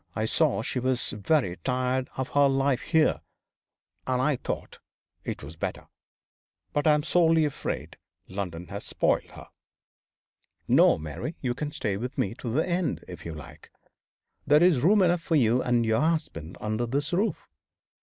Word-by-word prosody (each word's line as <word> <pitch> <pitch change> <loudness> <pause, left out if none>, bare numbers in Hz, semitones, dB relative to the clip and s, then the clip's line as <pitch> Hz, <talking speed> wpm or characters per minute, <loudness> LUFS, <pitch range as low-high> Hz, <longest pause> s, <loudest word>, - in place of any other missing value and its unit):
I 110 - 0
saw 135 -1 +2
she 125 - -2
was 130 0 0
very 105 - 0
tired 130 0 -1
of 130 -1 -2
her 145 0 +4
life 135 -1 +1
here, 160 -2 +2 0.9
and 130 -1 +1
I 140 +3 +2
thought - - -5 0.4
it - - -5
was 75 +3 -9
better. 80 - -5 0.8
But 145 +1 +1
I'm 150 -1 +4
sorely 165 -2 +3
afraid 145 - -4 0.3
London 90 -3 -5
has 100 0 -6
spoiled - - 0
her. - - -12 1.2
No, - - +5
Mary, 80 - -6
you 125 -3 -1
can 145 +4 -4
stay 105 -8 -2
with 125 +4 -5
me 100 - 0
to 120 - -4
the 155 +9 +1
end, 175 -1 -1
if 85 -2 -9
you 80 - -6
like. 75 -3 -12 0.8
There 150 +3 +6
is 175 -7 +5
room 195 +6 +5
enough 175 -1 +2
for 165 -1 0
you 125 -3 +3
and 120 -2 +1
your 110 +4 +2
husband 155 - -2
under 110 +3 -2
this 145 +6 -1
roof. 200 +6 0
130 Hz, 165 wpm, -27 LUFS, 110-155 Hz, 1.2 s, There